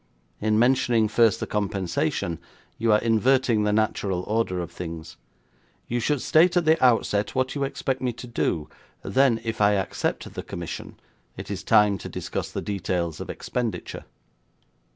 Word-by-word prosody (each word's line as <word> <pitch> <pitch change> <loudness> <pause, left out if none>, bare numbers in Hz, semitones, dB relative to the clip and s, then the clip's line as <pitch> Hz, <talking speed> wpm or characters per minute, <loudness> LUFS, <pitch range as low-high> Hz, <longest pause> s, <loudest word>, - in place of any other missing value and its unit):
In 110 0 +1
mentioning 120 -2 +3
first 110 -1 +3
the - - -2
compensation, 95 -5 -1 0.4
you 115 0 +2
are 105 - +6
inverting 115 -1 +2
the 105 - +2
natural 105 -4 0
order 105 -4 -1
of 85 - -5
things. 80 -2 -7 0.7
You 120 - -1
should 140 +2 0
state 175 +3 +4
at 175 - +2
the 160 -1 +3
outset 105 -4 +2
what 130 0 0
you 140 - -2
expect 135 -1 -2
me 125 -1 0
to 120 - -9
do, 85 -10 -1 0.4
then, 130 -4 +3
if 115 -2 -3
I 105 0 +5
accept 95 -2 -2
the - - -5
commission, - - -7 0.4
it - - -7
is 95 -2 -3
time 105 -2 +4
to - - -7
discuss - - -4
the - - -4
details 90 -4 -2
of - - -7
expenditure.' 120 -3 -4
110 Hz, 160 wpm, -25 LUFS, 100-125 Hz, 0.7 s, are